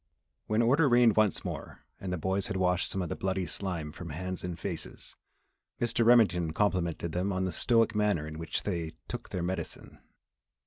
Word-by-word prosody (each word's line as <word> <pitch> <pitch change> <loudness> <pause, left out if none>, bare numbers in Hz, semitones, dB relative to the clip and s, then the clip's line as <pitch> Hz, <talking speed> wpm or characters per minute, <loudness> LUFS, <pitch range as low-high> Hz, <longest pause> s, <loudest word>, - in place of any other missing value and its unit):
When 110 +2 +2
order 140 +5 +4
reigned 120 -3 +5
once 110 -3 +2
more - - -6
and 95 - -4
the 90 - -1
boys 95 +4 0
had 105 - -2
washed 90 -1 +1
some 95 - -1
of 85 - -4
the - - -2
bloody 95 -1 -1
slime 85 -3 -3
from 85 +2 -8
hands 90 +4 -4
and 90 -2 -4
faces, - - -5 0.6
Mr. 120 0 +2
Remington 95 -9 +4
complimented 85 -4 0
them 90 +4 -1
upon 95 0 0
the 95 - -1
stoic 115 +1 +3
manner 105 -8 +1
in 80 +1 -7
which 80 -1 -3
they 85 -5 -2
"took - - -6
their 90 - -3
medicine." 90 -2 -5
95 Hz, 185 wpm, -30 LUFS, 85-105 Hz, 0.6 s, reigned